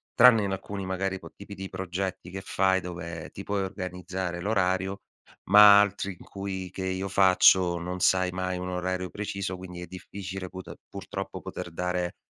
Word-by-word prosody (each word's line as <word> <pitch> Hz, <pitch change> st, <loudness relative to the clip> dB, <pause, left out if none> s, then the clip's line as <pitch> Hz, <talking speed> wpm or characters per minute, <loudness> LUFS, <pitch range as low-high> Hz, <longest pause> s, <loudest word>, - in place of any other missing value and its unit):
tranne 120 Hz, -3 st, +7 dB
in 100 Hz, -1 st, -1 dB
alcuni, 95 Hz, 0 st, -5 dB
magari 95 Hz, 0 st, -2 dB
co -, -, -11 dB
tipi 100 Hz, 0 st, -10 dB
di 95 Hz, 0 st, -7 dB
progetti 95 Hz, -1 st, -4 dB
che 95 Hz, +1 st, -5 dB
fai 95 Hz, 0 st, +2 dB
dove 85 Hz, -2 st, -6 dB
ti 100 Hz, -, -9 dB
puoi 100 Hz, 0 st, -1 dB
organizzare 90 Hz, -2 st, -4 dB
l'orario, 95 Hz, -1 st, 0 dB, 0.5 s
ma 105 Hz, 0 st, +10 dB
altri 100 Hz, -1 st, -1 dB
in -, -, -14 dB
cui 95 Hz, -2 st, -5 dB
che 95 Hz, -, -5 dB
io 95 Hz, +1 st, -2 dB
faccio 95 Hz, -2 st, +5 dB
non 90 Hz, +2 st, -4 dB
sai 95 Hz, 0 st, +3 dB
mai 90 Hz, 0 st, -2 dB
un 90 Hz, 0 st, -4 dB
orario 90 Hz, 0 st, -2 dB
preciso, 100 Hz, -2 st, -4 dB
quindi 90 Hz, -1 st, -9 dB
è -, -, -5 dB
difficile 95 Hz, +1 st, -7 dB
put 95 Hz, 0 st, -8 dB, 0.2 s
purtroppo -, -, -6 dB
poter -, -, -6 dB
dare 90 Hz, +1 st, -2 dB
95 Hz, 170 wpm, -27 LUFS, 90-95 Hz, 0.5 s, ma